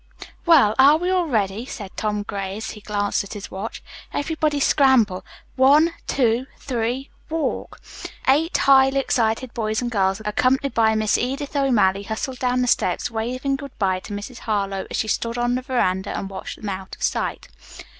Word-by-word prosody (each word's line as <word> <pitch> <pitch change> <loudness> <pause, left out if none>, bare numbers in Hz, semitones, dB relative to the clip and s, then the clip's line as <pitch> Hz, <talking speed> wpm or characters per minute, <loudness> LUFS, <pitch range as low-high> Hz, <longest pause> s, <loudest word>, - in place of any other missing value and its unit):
"Well, 275 -11 +6
are 285 +3 +7
we 355 +3 -1
all 365 -2 +1
ready?" 210 -4 0
said 205 -6 -8
Tom 210 -1 -1
Gray, 195 -1 -4
as 220 - -5
he 210 - -11
glanced 205 -1 -1
at 200 - -9
his 205 -1 -8
watch. 195 +4 -6 0.3
"Everybody 305 0 -1
scramble. 260 -10 +3 0.3
One, 295 +6 +5
two, 245 -1 +1
three, 250 +1 -3 0.2
walk." 320 0 -3 0.5
Eight 305 +6 +3
highly 270 0 +5
excited 235 -1 0
boys 220 -2 -1
and 245 -1 -3
girls 195 -2 +1
accompanied 255 +6 +1
by 220 -1 +3
Miss 215 -1 +2
Edith 275 +4 -3
O'Malley, 210 -9 +3
hustled 220 +5 -4
down 250 0 +1
the - - -1
steps, 245 - +1
waving 255 +5 -2
good 280 -1 -10
bye 190 -3 +1
to 195 - -11
Mrs. 210 +4 -7
Harlowe 200 -3 -2
as - - -3
she 220 - -1
stood 230 +2 -1
on 240 0 +1
the 255 - -1
veranda 200 -8 -1
and 195 - -5
watched 190 - -6
them 210 - -5
out 190 0 -6
of - - -10
sight. - - -1
235 Hz, 175 wpm, -22 LUFS, 205-270 Hz, 0.5 s, are